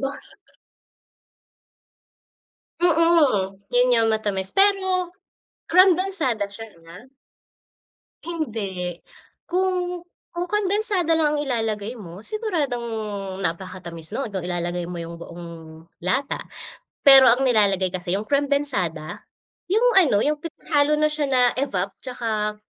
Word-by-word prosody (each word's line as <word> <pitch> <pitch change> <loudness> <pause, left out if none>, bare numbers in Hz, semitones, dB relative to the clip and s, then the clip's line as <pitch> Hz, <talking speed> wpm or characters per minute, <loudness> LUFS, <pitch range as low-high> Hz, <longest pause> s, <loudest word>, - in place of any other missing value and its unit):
Ba 270 0 -1 2.7
Mm. 315 - +3
Yun 245 +1 +3
yung 230 -2 +3
matamis, 205 -3 -1
pero 380 -3 +2 0.6
Kremdensada 360 - +3
siya 225 +3 -9 0.2
ah? 180 +7 -12 1.2
Hindi. 200 - -4 0.5
Kung 360 -1 -1 0.3
kung 350 0 -3
kondensada 395 -3 +1
lang 300 -2 +2
ang 295 - 0
ilalagay 225 -3 -2
mo, 180 -1 -10
siguradong 315 - -2 0.6
napakatamis 170 0 -5
no'n, 270 -2 -3
kung 190 -3 -4
ilalagay 175 0 -3
mo 180 - -6
yung 170 0 -8
buong 170 0 -9 0.6
lata. 265 +9 0 0.7
Pero 270 -2 +9
ang 250 +3 +1
nilalagay 200 -6 +3
kasi 180 -1 -3
yung 210 +2 -5
kremdensada, 275 - -1 0.5
yung 440 +5 +3
ano, 265 - +4
yung 300 +1 0
pinaghalo 300 -2 0
na 305 0 +3
siya 300 -1 -1
na 255 -2 +4 0.2
evap 200 -8 -2
tsaka 215 -4 -3
250 Hz, 110 wpm, -23 LUFS, -, 2.7 s, Pero